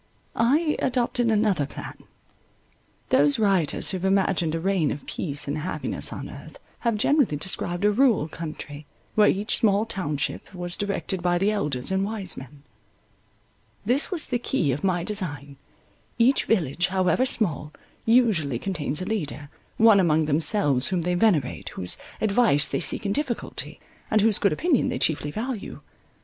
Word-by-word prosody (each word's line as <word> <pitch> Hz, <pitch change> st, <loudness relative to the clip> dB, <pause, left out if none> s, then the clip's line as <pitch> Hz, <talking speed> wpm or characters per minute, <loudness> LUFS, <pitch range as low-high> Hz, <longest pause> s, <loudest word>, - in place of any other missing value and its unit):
I 300 Hz, +7 st, +2 dB
adopted 245 Hz, -1 st, 0 dB
another 210 Hz, -9 st, +2 dB
plan. -, -, -8 dB, 1.1 s
Those 145 Hz, 0 st, +4 dB
writers 195 Hz, -8 st, +2 dB
who 190 Hz, -, -2 dB
have -, -, -9 dB
imagined 190 Hz, -4 st, +1 dB
a -, -, -2 dB
reign 180 Hz, -4 st, +1 dB
of 145 Hz, -, -5 dB
peace 145 Hz, -4 st, -3 dB
and 145 Hz, +2 st, -2 dB
happiness 165 Hz, +5 st, -2 dB
on -, -, -6 dB
earth, -, -, -11 dB, 0.2 s
have 235 Hz, -2 st, 0 dB
generally 255 Hz, -, +2 dB
described 175 Hz, +3 st, -3 dB
a 210 Hz, -, +5 dB
rural 225 Hz, -, +3 dB
country, 155 Hz, -2 st, -8 dB, 0.3 s
where 210 Hz, -1 st, +5 dB
each 205 Hz, +3 st, +1 dB
small 210 Hz, 0 st, +3 dB
township 185 Hz, -3 st, -3 dB
was 175 Hz, -1 st, -4 dB
directed 200 Hz, -2 st, -3 dB
by 175 Hz, 0 st, +1 dB
the 195 Hz, +4 st, +2 dB
elders 145 Hz, -9 st, -1 dB
and 190 Hz, 0 st, +1 dB
wise 200 Hz, -3 st, -4 dB
men. 140 Hz, +2 st, -11 dB, 1.2 s
This 250 Hz, +7 st, +1 dB
was 350 Hz, -5 st, 0 dB
the 245 Hz, -2 st, -1 dB
key 185 Hz, -, 0 dB
of 135 Hz, +3 st, -3 dB
my 180 Hz, -3 st, +1 dB
design. 145 Hz, -9 st, -4 dB, 0.6 s
Each 245 Hz, +4 st, +3 dB
village, 175 Hz, -4 st, +1 dB
however 190 Hz, +5 st, +1 dB
small, 150 Hz, -, -2 dB, 0.3 s
usually 215 Hz, -, +2 dB
contains 155 Hz, 0 st, -3 dB
a -, -, -5 dB
leader, 150 Hz, -8 st, -4 dB, 0.3 s
one 220 Hz, -3 st, +6 dB
among 160 Hz, -3 st, +3 dB
themselves 145 Hz, -3 st, +2 dB
whom 185 Hz, -2 st, 0 dB
they 180 Hz, +2 st, -1 dB
venerate, 175 Hz, -, +1 dB
whose 90 Hz, -1 st, -1 dB, 0.2 s
advice 210 Hz, -9 st, +3 dB
they -, -, -1 dB
seek 170 Hz, -, +1 dB
in 200 Hz, -, 0 dB
difficulty, 275 Hz, -4 st, -4 dB, 0.3 s
and 215 Hz, -, +3 dB
whose 215 Hz, -1 st, +2 dB
good 200 Hz, -, +2 dB
opinion 320 Hz, -7 st, +1 dB
they -, -, -2 dB
chiefly 150 Hz, -2 st, 0 dB
value. 225 Hz, -, -5 dB
190 Hz, 160 wpm, -25 LUFS, 150-220 Hz, 1.2 s, one